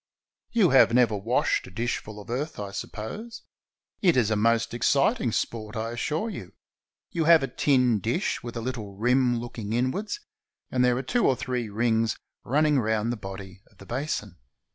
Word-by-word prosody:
You 210 -8 +4
have 130 -3 +6
never 120 -4 +4
washed 120 +9 0
a - - -10
dishful 110 0 -3
of 105 +3 -9
earth, 145 +3 -3
I 100 -1 -5
suppose. 215 - -7 0.6
It 175 - +4
is 110 -3 +3
a - - +3
most 115 +2 +2
exciting 120 0 +2
sport, 110 -1 -3
I 115 +1 -3
assure 150 - -2
you. 175 - -7 0.6
You 165 -2 0
have 165 -3 +7
a - - 0
tin 125 -3 +2
dish 120 - -1
with 120 0 -6
a - - -3
little 115 -5 -5
rim 125 +2 +2
looking 115 -3 -5
inwards, 130 - -1 0.5
and 125 -1 +2
there 125 -1 +3
are 130 - -2
two 240 - +1
or 130 - +3
three 125 -2 -3
rings 110 +1 +1 0.3
running 150 +2 +3
round 110 0 0
the - - -1
body 95 -2 -9
of 105 - -28
the 100 - -13
basin. 105 - -3
120 Hz, 180 wpm, -26 LUFS, 110-135 Hz, 0.6 s, have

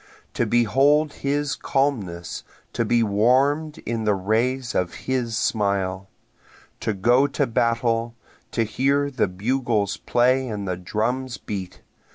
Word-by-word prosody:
To - - 0
behold 135 +6 +3
his 145 +1 -1
calmness 100 -12 -2 0.3
to 115 - 0
be 115 +1 +2
warm'd 130 +9 +2
in 115 -1 -2
the 105 -1 +2
rays 120 +6 0
of 90 -1 -1
his 125 -4 -1
smile! 100 -3 -1 0.7
To 110 - -1
go 120 +8 +4
to 140 0 0
battle 115 0 0 0.3
to 115 - 0
hear 140 +6 +1
the 130 -6 +1
bugles 105 +1 -1
play 130 +2 +2
and 105 -4 -4
the 90 - -1
drums 120 +7 -2
beat! 95 -3 -7
120 Hz, 130 wpm, -23 LUFS, 105-130 Hz, 0.7 s, go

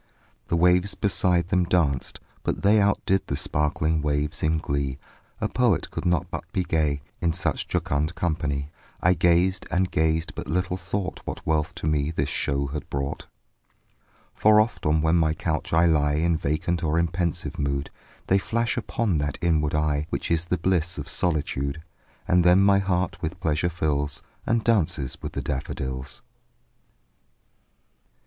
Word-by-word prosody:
The - - 0
waves 90 +3 +3
beside 90 -3 +1
them 90 0 +3
danced; 80 -8 0 0.2
but - - -3
they 105 +1 +5
Outdid 100 -1 +1
the 70 - -2
sparkling 75 +1 0
waves 75 0 -1
in 80 +1 +2
glee; 70 -3 -2 0.4
A - - 0
poet 120 -7 +1
could - - -5
not 90 -4 0
but - - -6
be 90 - 0
gay, 75 -4 0 0.2
In 85 -1 +1
such 85 - -1
a - - -35
jocund 75 +4 -1
company; 75 -5 -2 0.3
I 90 - +4
gazed 90 +2 +2
and 90 0 0
gazed 80 +1 +1
but - - -6
little 90 +3 0
thought 95 +1 -4
What - - -6
wealth 80 +1 0
to 85 - -5
me 75 -1 +1
the 75 -3 -1
show 70 0 -1
had 75 0 -6
brought: 70 0 -3 1.1
For 105 0 +5
oft, 110 -7 0
when 80 +1 +2
on 80 +2 +4
my 80 -1 +2
couch 80 -2 -2
I 80 +1 +4
lie 75 -3 +3
In 85 +2 +2
vacant 80 +3 -1
or 80 0 +1
in 85 0 +3
pensive 85 -3 -2
mood, 70 0 -1 0.3
They 95 - +3
flash 115 +4 -1
upon 110 -7 0
that 75 -1 -2
inward 75 -3 +1
eye 75 0 0
Which - - -3
is 85 0 +1
the 90 - 0
bliss 85 -1 0
of - - -6
solitude; 70 -3 -1 0.5
And 90 -1 +4
then 90 +2 +6
my 100 0 +5
heart 90 -2 -1
with 85 +1 -4
pleasure 80 -1 0
fills, 75 -4 -1 0.2
And 115 -1 +2
dances 85 - +1
with - - -6
the - - -3
daffodils. 65 -1 -4
80 Hz, 165 wpm, -25 LUFS, 75-90 Hz, 1.1 s, then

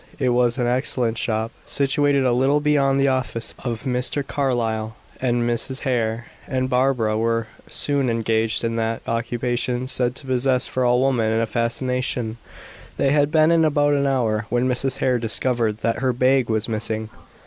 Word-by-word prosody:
It 130 -3 +1
was 120 0 +2
an 125 - 0
excellent 120 -2 0
shop, 110 -1 -1 0.2
situated 140 0 +2
a 125 - +3
little 135 +4 +2
beyond 140 -2 +2
the 135 - +3
office 125 -3 -2
of 120 -3 -4
Mr. 130 +2 -1
Carlyle, 115 -6 -1 0.3
and 120 -2 +1
Mrs. 120 +3 -1
Hare 120 -2 -1 0.2
and 130 -1 -1
Barbara 125 -4 +1
were 115 0 0 0.2
soon 140 -3 0
engaged 115 -1 0
in 115 0 -1
that 115 0 -2
occupation 120 +1 -1
said 125 -1 +2
to 135 - -4
possess 130 0 +1
for 130 - -2
all 125 +1 +3
women 115 -4 +1
a 115 - +1
fascination. 120 0 -2 0.6
They 135 - +2
had 145 0 +3
been 155 0 +4
in 165 -1 +4
about 145 -1 +2
an 140 -1 +1
hour, 115 -5 0
when 120 +1 +1
Mrs. 130 +1 +1
Hare 125 -2 +1
discovered 115 -1 0
that 115 +1 0
her 130 -1 +1
bag 130 0 +2
was 110 -1 0
missing. 110 -1 -2
125 Hz, 170 wpm, -22 LUFS, 115-135 Hz, 0.6 s, been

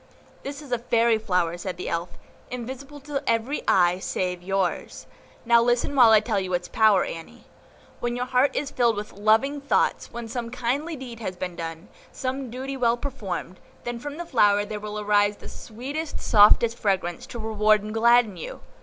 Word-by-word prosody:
"This 280 +2 -7
is 275 - -13
a 245 - +1
fairy 230 -1 +2
flower," 180 -5 0
said 180 -1 -5
the 180 - -5
Elf, 170 +1 -2 0.4
"invisible 260 +4 -7
to 285 0 -3
every 230 +6 0
eye 180 -1 +4
save 180 -1 -2
yours; 190 -1 -2 0.4
now 235 0 +5
listen 240 +4 +1
while 245 -4 +7
I 220 -1 +7
tell 215 0 -2
its 180 -2 -2
power, 215 -4 +4
Annie. 165 -1 -9 0.6
When 240 0 -2
your 245 0 -2
heart 255 +2 +2
is 280 0 -2
filled 235 -3 +2
with 210 +1 -6
loving 225 +8 +2
thoughts, 280 - 0
when 235 -1 -6
some 235 0 -4
kindly 255 +7 -2
deed 250 -4 -9
has 185 -5 -4
been 180 -1 -5
done, 165 +2 -6 0.2
some 265 0 -4
duty 260 +3 -5
well 240 -2 +2
performed, 205 -9 -5 0.2
then 240 -1 -4
from 290 +4 -7
the 345 - -5
flower 205 -7 +3
there 210 0 -5
will 210 0 -5
arise 205 0 +2
the - - -11
sweetest, 280 +8 -6
softest 225 +2 +5
fragrance, 185 -4 -1
to - - -8
reward 215 -1 +2
and 215 +1 -6
gladden 230 -3 +4
you. 165 - -7
230 Hz, 180 wpm, -25 LUFS, 200-250 Hz, 0.6 s, while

